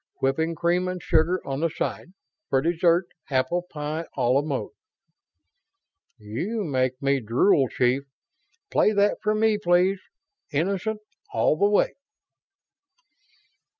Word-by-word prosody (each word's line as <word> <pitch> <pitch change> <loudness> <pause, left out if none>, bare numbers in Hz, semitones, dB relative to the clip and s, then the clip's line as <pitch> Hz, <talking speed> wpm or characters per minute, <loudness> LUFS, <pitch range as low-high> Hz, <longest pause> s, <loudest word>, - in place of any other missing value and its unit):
Whipping 160 +5 0
cream 175 +3 +1
and 185 0 -3
sugar 170 +2 +2
on 135 0 -3
the 165 +1 +1
side. 175 +3 -4 0.4
For 135 - +3
dessert, 170 +3 +2 0.2
apple 140 +7 0
pie 155 +2 -4
a 130 - 0
la 135 +3 +4
mode." 145 -3 -3 1.5
"You 145 - -4
make 130 -5 -1
me 140 0 +2
drool, 130 - +3
chief. 130 +3 +1 0.7
Play 215 - +3
that 205 0 +2
for 215 +2 +1
me, 215 -1 +2
please, 180 +1 +2 0.5
Innocent, 195 +7 -1 0.3
all 115 +6 +2
the 200 +6 +3
way." 205 - +2
165 Hz, 120 wpm, -25 LUFS, 135-185 Hz, 1.5 s, la